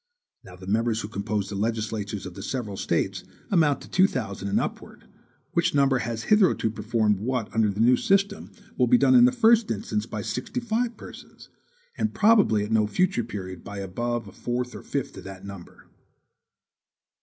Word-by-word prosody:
Now 90 - -12
the 90 +1 -12
members 110 +3 0
who - - -5
compose 100 -1 -3
the 100 - -5
legislatures 105 -1 -2
of - - -7
the 95 - -9
several 110 -2 -4
States - - -1 0.3
amount 155 -7 +3
to - - -11
two 190 0 +4
thousand 100 - -4
and 100 - +1
upwards, - - -6 0.5
which 170 -3 +1
number 135 -2 +3
has 115 -1 -4
hitherto 190 - +3
performed 105 -2 0
what 125 +1 -2
under 110 -1 +2
the 100 +2 -2
new 125 +2 +6
system 195 +6 0 0.3
will - - +4
be 250 - +6
done 260 - +4
in 245 -1 +8
the 250 - +4
first 235 -2 +4
instance 105 0 -2
by 110 -3 -5
sixty 125 - -3
five 235 0 -1
persons, - - -13 0.5
and 220 - -1
probably 205 - +4
at 105 - -5
no 110 -1 +3
future 180 - +1
period 95 -5 -7
by 100 - -8
above 115 +4 -3
a - - -10
fourth 125 +4 -3
or - - -8
fifth 140 -3 -4
of 95 - -9
that 95 0 -9
number. 100 -3 -11
115 Hz, 185 wpm, -25 LUFS, 100-165 Hz, 0.5 s, in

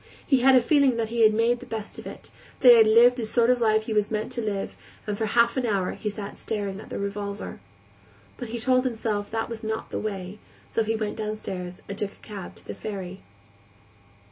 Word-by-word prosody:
He 270 -3 +3
had 265 +1 +6
a 255 - +7
feeling 275 -1 +3
that 225 -1 -1
he 235 0 -1
had 215 -1 +7
made 230 +3 +2
the 255 - -11
best 220 -2 -6
of - - -9
it, - - -11 0.3
that 250 - +9
he - - +10
had 225 -1 +6
lived 240 +3 +6
the 240 - -2
sort 235 +2 +3
of 250 -1 +1
life 220 -1 +3
he 220 - -3
was 210 -1 +1
meant 215 0 -2
to 235 - -3
live, 205 -3 -3 0.3
and 210 - -2
for 220 +1 -1
half 235 +4 +3
an 255 - +1
hour 195 -4 0
he 210 - -4
sat 205 -1 -7
staring 200 -3 -3
at - - -11
the - - -5
revolver. 200 0 -4 0.8
But 245 - -7
he 235 +1 -4
told 255 +2 +3
himself 220 -4 -2
that 225 0 -2
was 230 -1 -7
not 220 0 -4
the - - -2
way, 195 -1 -5 0.3
so 225 - +1
he 220 +1 -1
went 215 -1 -3
downstairs 190 -4 -5
and 200 - -5
took 205 -2 -3
a - - -20
cab 200 -4 -8
to - - -19
the - - -6
ferry. 190 -3 -6
220 Hz, 235 wpm, -26 LUFS, 205-235 Hz, 0.8 s, he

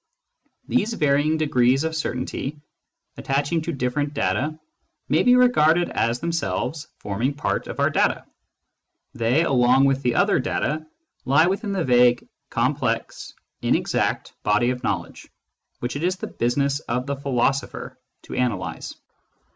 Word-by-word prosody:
These 230 -2 +1
varying 150 -2 +2
degrees 135 -3 +2
of 160 0 -2
certainty 135 0 -3 0.6
attaching 145 +4 0
to 170 - -3
different 140 +1 -2
data 140 +10 -1 0.5
may - - +3
be 250 0 +5
regarded 175 -10 +4
as 115 +2 0
themselves 155 - -2
forming 115 +8 -2
part 145 - -2
of - - -7
our - - +3
data; - - +1 0.9
they, 120 +7 +2
along 130 -2 +4
with 135 0 +2
the 125 -3 0
other - - +3
data, 155 +1 -2 0.4
lie 140 +5 +4
within 200 +3 -1
the 190 -3 0
vague, 125 -2 +4 0.2
complex, - - -1 0.3
inexact - - 0
body 105 +4 +2
of 125 -1 -5
knowledge - - -3 0.5
which 120 +3 -3
it 145 - -3
is 185 +1 +1
the 185 - -6
business 140 +4 0
of 125 -3 -3
the 140 0 -2
philosopher 135 0 -1 0.3
to - - -9
analyse. 125 -4 -2
140 Hz, 135 wpm, -23 LUFS, 125-160 Hz, 0.9 s, be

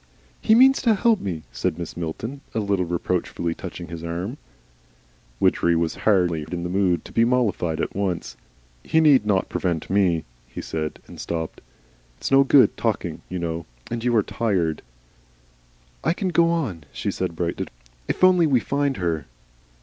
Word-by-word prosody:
"He 220 - +5
means 265 +3 +6
to 230 -4 +4
help 225 +1 +3
me," 85 -5 -4
said - - -1
Mrs. 85 -1 -6
Milton, 110 - -5
a - - +2
little 100 -3 0
reproachfully, 85 -1 -2
touching 85 +1 -8
his 85 -1 -7
arm. 90 - -4 1.0
Widgery 85 0 +3
was 85 0 0
hardly 90 -7 +2
in 85 -1 -3
the 90 - -3
mood 95 -2 +1
to - - -11
be 115 - +3
mollified 115 -9 +1
all - - +1
at - - -5
once. 95 -8 -2 0.5
"He 160 - +2
need 145 -9 +5
not 95 -3 +2
prevent 85 -3 -2
ME," 90 -5 +2 0.2
he - - -8
said, 80 -1 -4
and - - -12
stopped. 80 -1 -4 0.6
"It's - - -4
no 135 0 +7
good 135 -1 +5
talking, - - -2
you 90 - -3
know, 85 -1 -3 0.2
and 115 -1 -3
you 120 -1 +2
are 110 - +4
tired." 90 -10 -1 1.2
"I - - +2
can 185 +1 -2
go 170 -1 +4
on," 120 - -2
she - - -3
said 85 - -3
brightly, 85 0 -2 0.4
"if - - -2
only 180 -3 +6
we 130 -4 +4
find 140 +1 -1
her." 80 -5 -2
95 Hz, 170 wpm, -23 LUFS, 85-135 Hz, 1.2 s, no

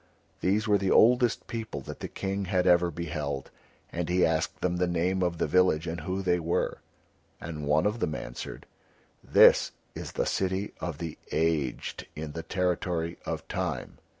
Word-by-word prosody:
These 105 +4 +1
were 105 -1 +4
the 95 0 0
oldest 120 +1 +4
people 115 -1 -5
that - - -8
the - - -4
King 100 0 -3
had 90 -1 +1
ever 90 -1 +5
beheld, 75 -3 -4 0.4
and 85 0 -3
he 90 +1 +4
asked 80 -1 0
them 90 -1 0
the 90 0 +2
name 90 +2 0
of 90 -2 0
the - - +1
village 85 -1 +3
and 85 -1 -4
who 95 +4 -2
they 90 -1 +2
were; 85 +1 -1 0.6
and 75 -4 -5
one 75 +4 +3
of 105 +3 0
them 75 -7 -1
answered, - - -7 0.6
"This - - +6 0.2
is - - -7
the - - 0
City 95 +1 -1
of 85 -5 -4
the 80 -1 -6
Aged 80 -6 -1
in 75 -1 -5
the 80 - -5
Territory 85 -1 -1
of - - -4
Time." - - -3
90 Hz, 175 wpm, -28 LUFS, 80-95 Hz, 0.6 s, This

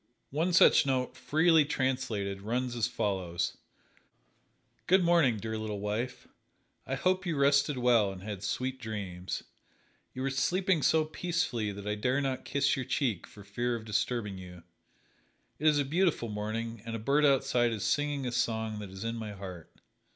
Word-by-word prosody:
One 160 +6 0
such 175 - +6
note, 130 -2 -1
freely 160 +1 +4
translated, 125 -8 -2
runs 120 +4 -2
as 115 -1 +1
follows: 95 -7 -2 1.3
"Good 185 +1 +5
morning, 170 -9 +4
Dear 110 +1 -4
Little 105 -2 -4
Wife. 105 +5 -3 0.6
I 135 - -1
hope 185 +7 +1
you 170 -5 -2
rested 140 0 +3
well 120 -5 +3
and 95 -1 -9
had 100 -2 -5
sweet 130 +5 -3
dreams. 95 -5 -5 0.7
You 130 - -3
were 135 - 0
sleeping 180 +6 +1
so 155 +2 +3
peacefully 155 - -1
that 100 0 -8
I 105 - 0
dare 125 +6 0
not 135 -2 -2
kiss 140 0 +1
your 130 - -3
cheek 125 - -1
for 105 - -13
fear 120 +5 -2
of 110 -2 -7
disturbing 105 -1 -1
you. 90 -2 -11 1.0
It 155 - +1
is 150 -1 +5
a 145 - +1
beautiful 160 -5 +1
morning 110 +2 -4
and 115 -1 -5
a - - -1
bird 140 +7 +2
outside 135 -4 +3
is 110 -3 -3
singing 145 -2 0
a 125 - -2
song 110 -3 -1
that 105 -2 -7
is 95 +2 -8
in 115 +1 -3
my 110 -2 -5
heart. 95 -4 -9
120 Hz, 170 wpm, -30 LUFS, 105-140 Hz, 1.3 s, such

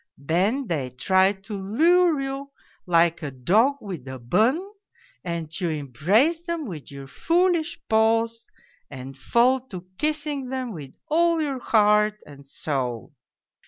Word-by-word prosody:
Then 185 - 0
they 150 - -2
try 190 +10 +2
to 195 +2 -10
lure 320 - +3
you 275 +1 -4 0.4
like 170 -1 +3
a 150 - -4
dog 200 - +2
with 175 -10 -7
a 130 0 -6
bun, 220 - +2 0.6
and 170 -2 -4
you 175 - 0
embrace 170 - +1
them 340 -3 -3
with 165 - -8
your 140 -1 -9
foolish 335 - 0
paws 225 +1 +1 0.4
and 135 -1 -9
fall 240 - +2
to 185 -6 -8
kissing'them 280 -5 -2
with 145 -6 -10
all 335 +1 +2
your 280 -4 -2
heart 210 -2 +3
and 140 -1 -14
soul. 130 -4 -4
210 Hz, 130 wpm, -24 LUFS, -, 0.6 s, lure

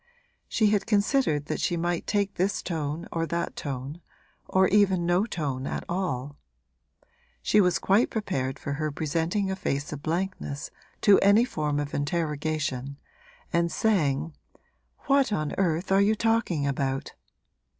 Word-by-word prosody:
She 215 -2 +3
had 205 -1 +1
considered 205 - +2
that - - -3
she 175 - 0
might 175 0 -1
take 200 -1 0
this 195 +3 -1
tone 155 -2 -3
or 165 0 -1
that 170 +2 -2
tone 140 +3 -5 0.5
or 190 0 +4
even 190 -4 +3
no 180 +5 +2
tone 140 - -3
at - - -3
all; 145 -6 -3 1.1
she 210 - +4
was 180 -2 +3
quite 200 +5 +3
prepared 135 - -2
for 140 - -4
her 155 - 0
presenting 165 +7 -1
a - - -1
face 140 -6 -2
of 145 - -7
blankness 165 -3 -3 0.3
to 205 -2 +6
any 205 +4 +5
form 150 -9 -1
of 145 -1 -4
interrogation 145 -3 -2 0.6
and 170 0 +2
saying, 160 -8 +1 0.7
'What 275 -3 +2
on 155 -7 -1
earth 175 0 0
are 195 +1 +5
you 210 +2 +3
talking 225 -9 +1
about?' 135 -1 -2
170 Hz, 145 wpm, -27 LUFS, 145-195 Hz, 1.1 s, to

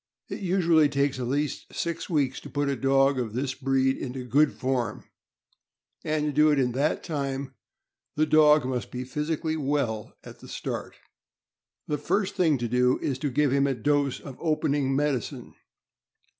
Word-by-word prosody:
It - - -5
usually 170 -5 +3
takes 140 -1 0
at 125 - -2
least 145 +2 -2
six 170 -1 -3
weeks 140 -6 0
to - - -11
put 145 -1 -1
a 140 - 0
dog 135 +1 +3
of 115 -4 -3
this 130 +2 -2
breed 135 0 +1
into 125 -1 -5
good 140 +5 +3
form; 125 -4 -2 1.0
and 155 -1 0
to 150 - 0
do 150 +1 +4
it 145 - +3
in 125 -2 +2
that 140 +5 0
time, 140 -4 -3 0.6
the 155 - +3
dog 150 -2 +5
must 125 -2 -3
be 125 0 -5
physically 155 +4 -2
well 135 -7 -2
at - - -12
the - - -13
start. - - -5 0.9
The 150 -1 -2
first 195 +6 0
thing 160 -5 +2
to 120 -1 -2
do 125 +2 +2
is 135 -2 -3
to 145 - -1
give 140 +1 +1
him 140 0 +3
a 135 - 0
dose 145 +2 +1
of 135 -3 -10
opening 145 -4 0
med 145 +1 +2
icine. - - -9
140 Hz, 175 wpm, -26 LUFS, 130-150 Hz, 1.0 s, dog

